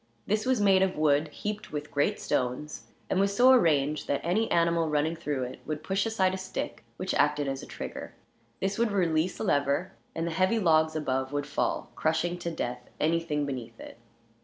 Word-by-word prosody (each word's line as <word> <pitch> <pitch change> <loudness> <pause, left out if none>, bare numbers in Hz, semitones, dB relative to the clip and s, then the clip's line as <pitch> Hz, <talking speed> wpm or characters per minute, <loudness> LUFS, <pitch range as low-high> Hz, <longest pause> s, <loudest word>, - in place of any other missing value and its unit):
This 215 +3 0
was 260 -3 +3
made 195 -2 +5
of 190 -3 +1
wood 150 0 +3
heaped 210 +7 -5
with 145 -1 -5
great 145 0 +1
stones, 130 +4 -2 0.2
and 190 - 0
was 200 0 +2
so 250 +4 +7
arranged 155 - +3
that 140 - +1
any 210 +7 +1
animal 170 -1 +2
running 150 +2 +1
through 150 -5 -2
it 125 - -6
would 155 0 -3
push 195 +3 0
aside 190 -4 +1
a 190 - -3
stick, 190 -9 -5
which 185 - -2
acted 150 -1 +2
as 135 0 -3
a - - -10
trigger. - - -7 0.4
This 195 +3 -1
would 235 -2 +2
release 175 -3 +1
a - - -4
lever, 145 +1 +1 0.2
and 165 - -1
the 170 - -2
heavy 185 +6 +2
logs 160 -5 +3
above 130 -3 -1
would 145 0 -1
fall, 145 - -2
crushing 165 +3 0
to 170 - -3
death 125 -6 -4
anything 155 -2 +1
beneath 120 -4 -6
it. - - -11
160 Hz, 195 wpm, -28 LUFS, 145-190 Hz, 0.4 s, so